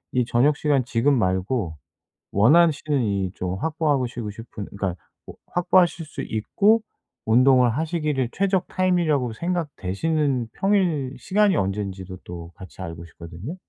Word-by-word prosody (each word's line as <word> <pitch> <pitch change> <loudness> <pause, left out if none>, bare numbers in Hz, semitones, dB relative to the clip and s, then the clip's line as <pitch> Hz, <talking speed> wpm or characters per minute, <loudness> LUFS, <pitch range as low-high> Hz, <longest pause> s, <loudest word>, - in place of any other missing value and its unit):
이 125 - +2
저녁 130 +5 +3
시간 140 -4 +1
지금 125 +3 +2
말고 95 -2 -1 0.6
원하시는 150 - +4
이 100 -3 -1
좀 90 0 -3
확보하시고 135 -8 -1
싶은 105 -2 -8
그러니까 95 -3 -2 0.3
뭐 - - -11
확보하실 175 -1 +2
수 155 - -8
있고 205 - +2 0.4
운동을 125 +2 +5
하시기를 150 -6 -1
최적 190 -2 0
타임이라고 170 -9 +1
생각되시는 150 - -1
평일 175 -10 +1
시간이 205 0 +2
언제인지도 95 -1 -3
또 85 -1 -8
같이 95 0 -11
알고 85 -1 -7
싶거든요. 85 - -9
130 Hz, 315 characters per minute, -23 LUFS, 100-160 Hz, 0.6 s, 운동을